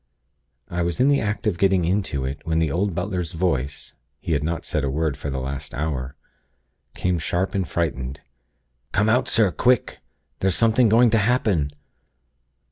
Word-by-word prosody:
I 90 0 -3
was 85 -1 -1
in 130 +3 +4
the 140 - +3
act 105 +2 -2
of 100 -6 0
getting 95 -3 +3
into 85 -7 -1
it, 70 +3 -4
when 80 0 -1
the 80 -3 +1
old 90 +2 0
butler's 90 -2 -2
voice 75 -5 -2 0.3
(he - - -5
had 75 -2 +1
not 80 +2 -2
said 75 - -1
a 70 - 0
word 75 +1 -1
for 70 +1 -5
the 65 - -3
last 70 +2 -5
hour) 70 -3 -3 0.8
came 90 -2 0
sharp 90 +5 -1
and 95 -4 -1
frightened: 70 -5 -2 0.7
'Come 105 +2 +2
out, 125 +3 +2
sir, 110 -4 +4
quick! 125 +5 +1 0.4
There's 95 -2 +1
something 115 +1 +4
going 115 +2 +5
to 110 - +4
happen!' 105 - +1
85 Hz, 175 wpm, -23 LUFS, 75-105 Hz, 0.8 s, going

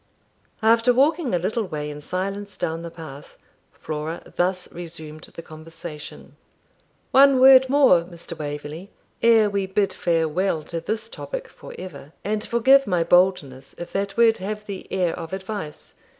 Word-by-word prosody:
After 230 +2 +5
walking 290 - +2
a - - +3
little 205 +7 -1
way 150 -4 -5
in 150 0 -9
silence 195 +5 -4
down 165 +1 -2
the 170 - -6
path, 155 -4 -11 0.3
Flora 155 +2 -5
thus 180 +1 0
resumed 160 -3 -8
the 165 - -11
conversation. 155 -1 -10 0.7
'One 275 -1 +6
word 260 0 +8
more, 265 -11 +5
Mr. 170 -1 -10
Waverley, 150 +4 -6 0.3
ere 225 -2 +5
we 200 -1 -1
bid 195 +1 0
farewell 165 0 0
to 165 +2 -5
this 220 +5 -3
topic - - -6
for - - -12
ever; 155 -5 -10
and 210 +1 -2
forgive 265 +4 +4
my 180 -3 +2
boldness 165 -7 +1
if 175 - -8
that 195 +1 -2
word 230 -1 +5
have 210 +2 -5
the 200 -2 -8
air 180 -3 0
of 165 0 -7
advice. 190 -5 -6
185 Hz, 150 wpm, -23 LUFS, 160-215 Hz, 0.7 s, word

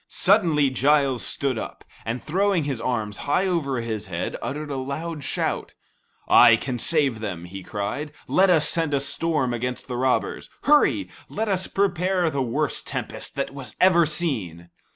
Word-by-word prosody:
Suddenly 165 -9 +3
Giles 135 -1 +2
stood 135 -5 -1
up, - - -8 0.2
and 115 +3 -3
throwing 190 +1 +1
his 135 -5 -3
arms 110 -5 -2
high 185 +6 +2
over 145 -9 -1
his 110 -3 -4
head, 85 -1 -3
uttered 150 +1 -4
a - - -2
loud 145 +4 -4
shout. - - -3 0.5
"I 120 -1 +8
can 125 +1 -4
save 140 -5 +1
them," 90 -6 -5
he 95 +2 -8
cried. 105 +11 -4 0.2
"Let 190 +1 +4
us 160 -4 +4
send 165 -4 +1
a - - +2
storm 140 -2 0
against 125 +1 -4
the 125 -1 -4
robbers. 130 +1 0
Hurry, 295 0 +4 0.2
let 220 +1 -2
us 185 -2 0
prepare 185 -3 +1
the 140 -1 -1
worst 130 +2 -1
tempest - - -5
that 140 - -2 0.3
ever 185 -2 +5
was 160 -2 +4
seen." 95 - -1
140 Hz, 165 wpm, -24 LUFS, 120-170 Hz, 0.5 s, I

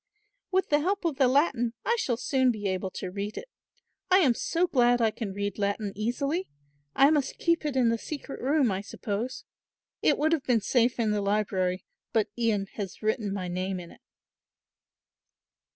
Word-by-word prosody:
"With 380 0 +1
the 295 - +4
help 380 +4 -1
of 315 -5 0
the 270 -3 +5
Latin 255 -4 +2
I 470 - +3
shall 240 - 0
soon 260 0 +2
be 210 -4 -1
able 190 0 -2
to 185 0 -6
read 200 +2 -4
it. - - -6 0.6
I 370 - +6
am 290 -10 +5
so 335 +8 0
glad 245 -6 +3
I 225 -2 +3
can 215 -2 -5
read 200 +1 -3
Latin 200 0 -1
easily. 275 - -1 0.5
I 275 +2 +6
must 290 -4 0
keep 335 -2 +1
it 285 - -3
in 250 -3 +4
the 230 0 0
secret 285 0 -7
room, 275 -3 +2
I 190 0 -2
suppose. 215 +4 -4 0.6
It - - +3
would 310 +2 +2
have 320 -4 +1
been 245 -5 +2
safe 240 +2 +2
in 220 -2 +2
the 210 -1 0
library; 195 -3 0 0.3
but 220 -2 +2
Ian 225 -4 +1
has 200 0 -6
written 215 -1 0
my 190 -2 -3
name 185 +1 -2
in 170 -1 -10
it." - - -18
235 Hz, 185 wpm, -28 LUFS, 200-280 Hz, 0.6 s, I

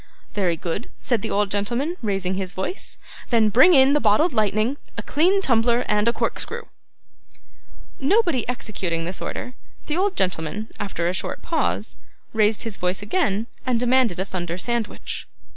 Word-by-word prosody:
'Very 180 -5 +1
good,' 175 +7 -3
said 240 -5 0
the - - -3
old 205 -1 +1
gentleman, 235 - -1
raising 195 -4 -1
his 190 -1 -3
voice, 190 - -4 0.3
'then 225 -3 +4
bring 265 - +7
in 265 +1 +6
the 295 - +4
bottled 300 +7 +3
lightning, 215 +4 +1 0.2
a - - -3
clean 375 +6 +2
tumbler, 235 -2 +3
and 210 +1 +2
a - - +5
corkscrew.' - - -2 1.4
Nobody 340 - +2
executing 195 -9 -2
this 180 +2 -5
order, 250 - -5 0.3
the 305 - -1
old 390 +1 +1
gentleman, 185 +4 -1
after 185 -4 -2
a 175 - 0
short 190 - -3
pause, - - -1 0.4
raised 215 -1 +3
his 225 -4 -5
voice 180 +2 -1
again 215 - 0 0.2
and 250 -3 +1
demanded 245 -6 +2
a 190 - 0
thunder 175 -3 -4
sandwich. 235 +2 -3
220 Hz, 160 wpm, -23 LUFS, 190-260 Hz, 1.4 s, bring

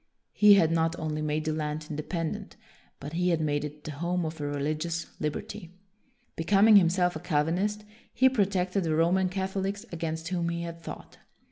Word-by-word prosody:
He 210 -1 +7
had 165 -5 +4
not 165 0 +1
only 155 -1 -3
made 155 +1 -1
the 155 - 0
land 155 0 -3
independ 155 +2 -3
ent, - - -9 0.4
but 145 +3 -7
he 180 +2 +1
had 170 -2 +2
made 145 -2 0
it 150 0 -7
the 155 - -5
home 170 +4 -2
of 160 0 -5
reli 145 +1 -1
gious 165 +1 -3
liberty. 170 +4 -5 0.6
Becoming 200 +5 +5
himself 180 -1 +3
a - - -4
Cal 155 -4 +1
vinist, 205 +6 -1 0.3
he 260 - +4
protected 195 -5 +1
the 160 -2 0
Roman 180 +3 +2
Catholics 195 +1 -3
against 160 -1 -4
whom 175 -2 -1
he 170 0 -3
had 170 0 -7
fought. - - -9
170 Hz, 180 wpm, -28 LUFS, 155-185 Hz, 0.6 s, He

